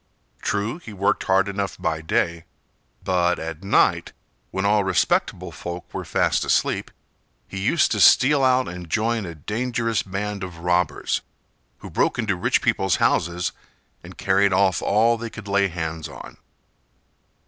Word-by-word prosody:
True, 105 - -2
he 110 -11 -10
worked 100 0 0
hard 95 0 +3
enough 100 0 -3
by 80 -1 -2
day, 85 +1 -1 0.6
but 90 -1 +1
at 80 +2 -6
night, 100 - +2 0.4
when 95 +1 -2
all 105 0 +3
respectable 95 -1 0
folk 90 0 -8
were - - -4
fast - - +1
asleep, - - 0 0.6
he 95 - -6
used 140 +8 +2
to - - 0
steal 140 +1 +6
out 130 0 +3
and 90 -1 -8
join 115 +1 0
a 85 - -7
dangerous 115 - -1
band 100 +1 -4
of 90 -3 -7
robbers, 90 -3 0 0.6
who - - -8
broke - - +1
into 110 -5 0
rich 90 - +1
people's 95 -2 +2
houses 85 +2 +1 0.5
and - - -12
carried 100 +1 +2
off 95 0 +2
all 115 +3 +2
they 115 0 -5
could 115 -2 -10
lay 100 0 +2
hands 80 -2 -5
on. - - -11
95 Hz, 150 wpm, -23 LUFS, 90-110 Hz, 0.6 s, steal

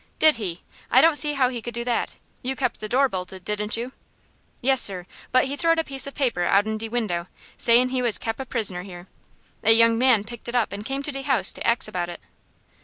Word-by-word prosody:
"Did 310 -5 +4
he? 180 -6 -5 0.3
I - - +5
don't 325 -1 +4
see 295 0 +3
how 260 -3 +2
he 245 -2 -6
could 240 0 -7
do 235 - -3
that. 240 -1 -2 0.3
You 265 +1 -3
kept 250 -3 -2
the 215 - -7
door 270 +4 +3
bolted, 185 -3 -7
didn't 210 +1 -2
you?" 240 +3 -5 0.7
"Yes, 265 0 +4
sir; 185 -3 +5 0.3
but 255 +1 +3
he 275 +2 -3
throwed 330 +2 +1
a 325 - +1
piece 275 -2 0
of 280 - -9
paper 245 -10 -1
out'n 210 +4 +1
de 225 0 -6
window, 200 -7 -3 0.3
sayin' 240 +2 +4
he 255 0 -1
was 235 -3 +1
kep' 225 +1 -5
a 265 - -5
prisoner 205 -8 +1
here. 180 -1 -11 0.6
A 225 - +6
young 230 0 +4
man 250 -5 +4
picked 235 +2 -9
it 240 - -5
up, 235 -4 0
and 205 +1 -6
came 270 +4 -4
to 295 - -1
de 275 -1 -4
house 260 -8 +2
to - - -5
ax 235 0 +2
about 175 -1 -4
it." 175 - -8
235 Hz, 240 wpm, -23 LUFS, 205-265 Hz, 0.7 s, A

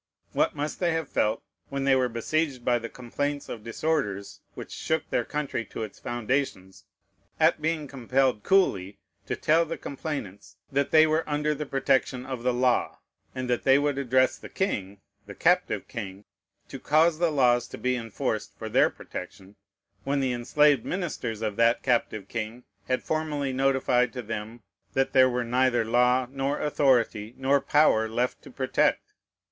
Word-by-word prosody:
What - - +1
must 145 +1 -3
they 175 -2 +1
have 160 -2 -2
felt, 110 +1 0 0.3
when 140 0 -3
they 135 -1 +4
were 130 -1 +2
besieged 130 +2 -1
by 120 -1 +3
complaints 125 +5 -4
of 110 - -7
disorders 115 -5 -2 0.2
which - - -8
shook 160 0 -2
their - - +1
country 145 -5 -3
to - - -6
its 110 - -8
foundations, 120 -5 -3 0.5
at - - +3
being 155 -1 -1
compelled 130 -3 0
coolly 100 - +2 0.3
to - - -1
tell 160 +2 +3
the 165 0 -5
complainants 105 - -6
that 140 0 +1
they 155 0 +6
were 160 +1 +1
under 150 +1 0
the 150 0 -5
protection 135 -2 0
of 130 -2 -5
the 125 +1 +1
law, 125 0 +1 0.4
and 130 -1 -3
that 125 -1 0
they 135 0 +6
would 145 -1 0
address 130 -1 +2
the - - -10
king 100 - -3 0.3
(the - - -9
captive - - +1
king) 100 -2 -7 0.4
to - - -8
cause 155 +2 +3
the 170 -1 +3
laws 125 -5 +3
to - - -9
be 125 0 0
enforced 115 -3 -3
for - - -6
their - - +4
protection, 95 +1 -9 0.5
when 140 +1 0
the 130 -2 0
enslaved 135 +2 +3
ministers 150 - -3
of 105 -2 -2
that 115 0 +3
captive 110 -5 0
king 115 +2 -5 0.2
had 130 - 0
formally 150 -4 -2
notified 130 -2 +2
to 125 -2 -6
them 110 +1 -6 0.3
that 135 0 +1
there 130 -1 +6
were 125 0 -1
neither 125 -1 +2
law 125 +2 +3
nor 135 +1 -2
authority 125 -6 +1
nor 135 +1 +2
power 110 -7 +3
left 120 +3 -1
to - - -13
protect! - - 0
130 Hz, 165 wpm, -27 LUFS, 115-145 Hz, 0.5 s, they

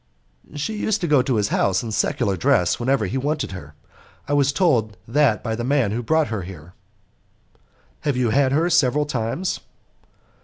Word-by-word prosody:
"She 150 +9 -3
used 215 0 0
to 175 - 0
go 145 -4 +4
to 130 -1 -1
his 105 -2 +1
house 95 +1 +1
in 115 - -5
secular 105 -1 0
dress 90 0 +2
whenever 125 -2 +1
he 125 +8 -2
wanted 145 -1 -2
her. 75 -6 -9 0.5
I 145 - -1
was 140 -1 +3
told 125 - +1
that 135 -2 +2
by 110 -2 -2
the 120 - -4
man 130 -5 +1
who 115 +3 -2
brought 160 +5 +1
her 110 -3 -3
here." 90 -2 -10 1.3
"Have 145 -4 -1
you 120 -3 +1
had 135 +2 +3
her 160 +5 +2
several 145 0 +3
times?" 140 +6 -2
125 Hz, 180 wpm, -22 LUFS, 110-145 Hz, 1.3 s, go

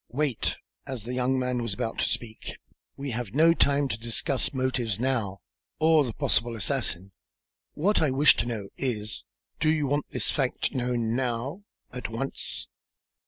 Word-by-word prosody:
Wait," 140 -2 0 0.3
as 130 -6 -4
the 120 +3 -5
young 130 +1 +1
man 125 -1 0
was 115 -4 -2
about 115 +3 -3
to - - +2
speak, 110 -2 -4 0.4
"we 140 -1 -4
have 120 -1 -4
no 165 +3 +6
time 140 -3 +3
to 115 - -3
discuss 120 +4 +1
motives 130 -5 0
now, 115 -7 -1 0.4
or 160 -1 +5
the 125 - -3
possible 115 0 +2
assassin. 105 -6 0 0.6
What 200 +7 +2
I 155 - +3
wish 140 +3 +6
to - - 0
know 105 -5 -4
is, 110 -5 -2 0.3
do 155 - +3
you 155 -2 +2
want 145 +1 0
this - - +1
fact - - 0
known 120 -2 0
now 130 - -2 0.3
at 125 -3 -4
once?" 115 +5 -3
125 Hz, 165 wpm, -27 LUFS, 115-140 Hz, 0.6 s, no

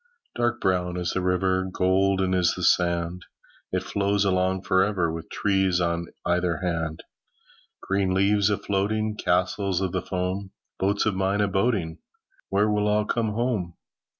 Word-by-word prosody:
Dark 120 0 0
brown 90 -1 0
is 90 -1 -1
the 95 - -1
river, 95 +1 +1
Golden 95 0 +2
is 90 -2 +2
the 90 - -5
sand. 85 0 +1 0.5
It - - -1
flows 100 0 0
along 95 0 +1
for 95 -1 +3
ever, 90 -6 0
With 80 0 -7
trees 95 -3 +1
on 85 -1 -1 0.2
either 90 -1 +1
hand. 80 -3 -3 0.8
Green 95 -1 0
leaves 100 +2 +3
a 105 - +1
floating, 105 +2 -1
Castles 95 0 0
of 95 -2 -1
the - - -1
foam, 95 +1 -3 0.3
Boats 100 +2 +1
of 110 - +1
mine 95 +2 0
a 105 - +2
boating— 95 -5 0 0.5
Where 100 +2 +2
will 105 0 +1
all 105 0 +2
come 110 -1 -1
home? 110 -7 -1
95 Hz, 155 wpm, -25 LUFS, 90-100 Hz, 0.8 s, for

